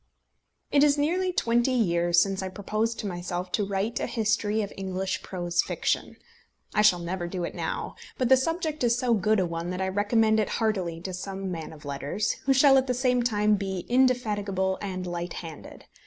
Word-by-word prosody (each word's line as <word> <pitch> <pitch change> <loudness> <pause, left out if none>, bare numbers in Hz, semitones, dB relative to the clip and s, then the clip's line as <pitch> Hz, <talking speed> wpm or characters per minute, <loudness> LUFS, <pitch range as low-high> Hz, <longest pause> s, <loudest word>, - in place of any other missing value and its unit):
It 285 0 +5
is 295 0 +4
nearly 360 +6 +1
twenty 240 -6 +2
years 175 -7 +3
since 195 +1 +1
I 190 - -3
proposed 215 +4 -2
to - - -7
myself 180 -1 -4
to 210 - +1
write 200 +3 -1
a - - -2
history 215 -1 0
of 200 - -6
English 190 0 -3
prose 175 -2 -1
fiction. - - -2 0.6
I 210 - +3
shall 210 -4 +5
never 175 +1 -4
do 180 0 -4
it - - -4
now, - - -4 0.2
but 255 - +1
the 265 - +7
subject 315 +2 -1
is 235 0 +3
so 250 -2 +1
good 215 0 +2
a 185 - +2
one 170 0 -4
that 180 0 -3
I 190 0 0
recommend 220 +2 +2
it 215 - 0
heartily 190 -7 -1
to 185 +1 -5
some 190 +1 -5
man 165 -3 -5
of 155 -2 -13
letters, 145 +8 -2
who 275 - +3
shall 270 0 +6
at 260 - -3
the 250 - 0
same 250 -1 +2
time 210 -3 +2
be 190 -2 -4
indefatigable 210 -7 +1
and 185 -2 -4
light 175 -1 -4
handed. 160 -3 -9
205 Hz, 200 wpm, -27 LUFS, 180-235 Hz, 0.6 s, the